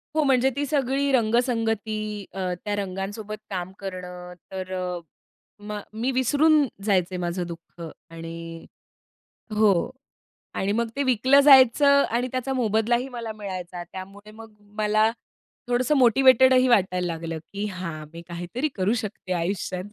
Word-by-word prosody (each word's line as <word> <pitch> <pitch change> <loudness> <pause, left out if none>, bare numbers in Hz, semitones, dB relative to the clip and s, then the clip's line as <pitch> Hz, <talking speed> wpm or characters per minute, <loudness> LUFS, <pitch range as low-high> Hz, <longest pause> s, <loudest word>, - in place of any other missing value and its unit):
हो, 310 - +3
म्हणजे 265 -1 +3
ती 290 0 -1
सगळी 275 -1 0
रंगसंगती 225 -2 +1 0.4
अ, 185 -2 -2
त्या 205 -1 -2
रंगांसोबत 205 +2 -5
काम 185 -1 -4
करणं, 180 -2 -7 0.2
तर 190 -1 -6
अ, 180 -1 -3 0.7
मग 210 0 -4 0.2
मी 260 +3 +1
विसरून 290 +4 +3 0.2
जायचे 185 -3 +1
माझं 175 0 -2
दुःख 170 0 -11 0.3
आणि 165 0 -8 0.9
हो. 210 -5 +3 0.6
आणि 195 +1 0
मग 235 - 0
ते 280 - +1
विकलं 260 +2 +4
जायचं 280 +1 +7
आणि 245 +2 0
त्याचा 255 +1 -2
मोबदलाही 240 +1 +1
मला 235 -3 -6
मिळायचा. 185 -4 -6
त्यामुळे 195 +4 -10
मग 225 0 -13 0.3
मला 215 +1 +3 0.6
थोडंसं 245 +4 +2
मोटिव्हेटेडही 260 +1 +5
वाटायला 185 -5 +2
लागलं, 165 -1 -4
की 200 +1 -3
हां, 175 -6 -6
मी 170 - -9
काहीतरी 175 - -3
करू 195 +2 +1
शकते 200 -2 -6
आयुष्यात. 180 +1 -2
210 Hz, 135 wpm, -25 LUFS, 185-255 Hz, 0.9 s, जायचं